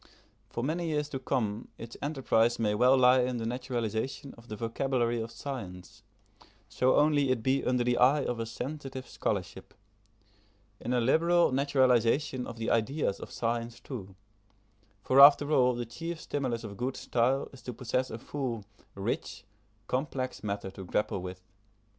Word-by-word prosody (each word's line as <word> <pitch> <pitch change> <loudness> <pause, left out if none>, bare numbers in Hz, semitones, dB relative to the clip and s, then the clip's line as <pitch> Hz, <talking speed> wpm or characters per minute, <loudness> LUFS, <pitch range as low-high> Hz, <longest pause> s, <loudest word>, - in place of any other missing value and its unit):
For 120 - -4
many 165 +5 -1
years 150 -2 -1
to 135 - -4
come 110 -3 -2
its 115 0 -9
enterprise 125 -5 +1
may 105 -2 +1
well 125 +5 +5
lie 125 0 +6
in 125 0 -1
the 115 - -3
naturalisation 125 +1 -3
of 115 +1 -17
the 110 - -6
vocabulary 120 +1 -1
of 110 - -5
science, 100 - -7 0.7
so 130 +1 +2
only 145 -2 +3
it 125 -4 0
be 135 +2 +2
under 125 -1 +1
the 120 0 +1
eye 135 +3 +5
of 120 -1 -2
a 115 - -3
sensitive 135 +2 -6
scholarship - - -4 1.0
in 120 - -4
a 125 - +2
liberal 170 +8 +3
naturalisation 130 -1 +2
of 115 - -8
the 115 - -2
ideas 115 -1 0
of - - -8
science 115 0 -3
too, 100 -8 -8 0.9
for 130 - +3
after 145 +1 +8
all 125 -4 +4
the 120 0 -3
chief 165 +8 -6
stimulus 130 -7 -3
of 100 -3 -8
good 125 +3 -2
style 125 +3 +1
is 130 - -13
to 125 - -6
possess 125 +2 -2
a 110 - -5
full, 120 -4 -4 0.3
rich, 100 0 -3 0.4
complex 130 -1 -3
matter 100 -2 -3
to 95 0 -9
grapple 105 +1 -1
with. 90 0 -7
125 Hz, 160 wpm, -30 LUFS, 115-135 Hz, 1.0 s, after